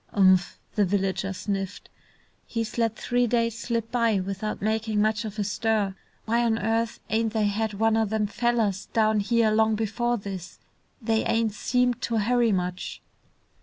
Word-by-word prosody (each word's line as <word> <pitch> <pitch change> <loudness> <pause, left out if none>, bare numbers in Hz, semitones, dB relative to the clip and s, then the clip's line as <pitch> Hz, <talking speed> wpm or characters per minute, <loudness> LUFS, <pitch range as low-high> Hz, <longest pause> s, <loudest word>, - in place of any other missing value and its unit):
"Umph!" 185 -3 +4 0.2
the 210 - +2
villager 195 0 0
sniffed. 195 0 -4 0.6
"He's 230 0 -3
let 225 -1 +1
three 245 +1 +1
days 230 -1 +1
slip 230 -1 -3
by 230 -4 +2
without 195 +3 -3
makin' 220 0 0
much 215 +1 +1
of 215 0 -6
a 210 - 0
stir. 210 -1 0 0.3
Why 235 +2 +2
on 225 -1 +2
earth 225 +2 -1
ain't 225 0 +1
they 220 -2 +1
had 210 +1 -1
one 225 +2 +2
o' 225 0 +2
them 215 0 0
fellers 215 -2 0
down 215 -1 +3
here 225 +1 +2
long 220 0 +3
before 235 +3 0
this? 195 -4 -7 0.5
They 225 0 +1
ain't 225 -2 +1
seemed 245 +3 +1
to 230 - -1
hurry 235 +2 +2
much." 180 -1 -2
220 Hz, 165 wpm, -26 LUFS, 200-230 Hz, 0.6 s, Umph